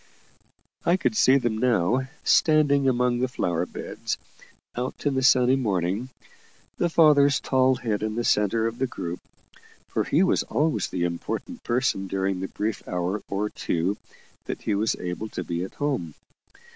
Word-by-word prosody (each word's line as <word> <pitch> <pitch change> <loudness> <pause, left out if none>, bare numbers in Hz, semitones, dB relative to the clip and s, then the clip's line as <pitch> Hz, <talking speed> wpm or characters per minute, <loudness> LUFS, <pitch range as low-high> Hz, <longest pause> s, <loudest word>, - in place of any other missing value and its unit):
I 175 +2 +3
could 210 +2 0
see 135 -9 +5
them 115 -4 -1
now, 125 +1 +2 0.2
standing 145 -3 +4
among 125 -1 +1
the 130 - +1
flower 90 -8 -1
beds, - - -5 0.6
out 125 +4 -4
in 145 - +2
the 130 - 0
sunny 130 0 +5
morning, 100 -1 -1 0.7
the 175 - +2
father's 145 -4 +5
tall 130 0 +2
head 110 -4 -2
in 110 0 -2
the 120 - -1
centre 110 +1 +2
of 115 +1 -3
the 130 - +1
group 85 -7 -5 0.7
for - - 0
he 160 +6 +2
was 185 - +2
always 155 +1 0
the 90 - -3
important 85 -1 -4
person 120 -5 0
during 95 0 -1
the 95 - -3
brief 105 +2 -3
hour 90 +3 -2
or 105 +2 -2
two 90 +4 -1 0.5
that - - -5
he - - 0
was 105 +3 +1
able 90 +5 -5
to - - -5
be 85 0 -3
at 95 - -8
home. 135 - -2
120 Hz, 165 wpm, -25 LUFS, 95-130 Hz, 0.7 s, see